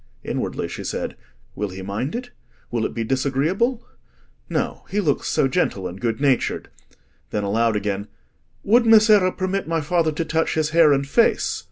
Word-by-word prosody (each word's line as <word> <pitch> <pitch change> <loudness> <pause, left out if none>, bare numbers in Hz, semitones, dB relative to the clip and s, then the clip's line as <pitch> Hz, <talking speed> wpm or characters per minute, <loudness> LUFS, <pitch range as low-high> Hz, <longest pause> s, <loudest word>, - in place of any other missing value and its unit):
Inwardly - - -3
she - - -7
said, - - -4 0.4
"Will 105 0 -3
he 95 +1 -8
mind 105 - -3
it? 245 0 -5 0.4
will 115 -2 0
it - - -11
be 115 - -1
disagreeable? 145 - 0 0.6
No, - - -2
he 205 - -1
looks 155 -8 0
so 135 - +2
gentle 115 - -1
and 90 +2 -9
good 115 -2 -1
natured." 135 -3 +1 0.6
Then 105 - -2
aloud 110 +3 +1
again— 100 0 -2 0.6
"Would 230 +3 +4
Messere 215 -4 +6
permit 185 0 -2
my 165 0 0
father 165 +1 +1
to 160 +2 -3
touch 160 0 0
his 155 -1 0
hair 165 -2 +6
and 140 0 +1
face?" 230 +11 +2
145 Hz, 170 wpm, -22 LUFS, 115-185 Hz, 0.6 s, Messere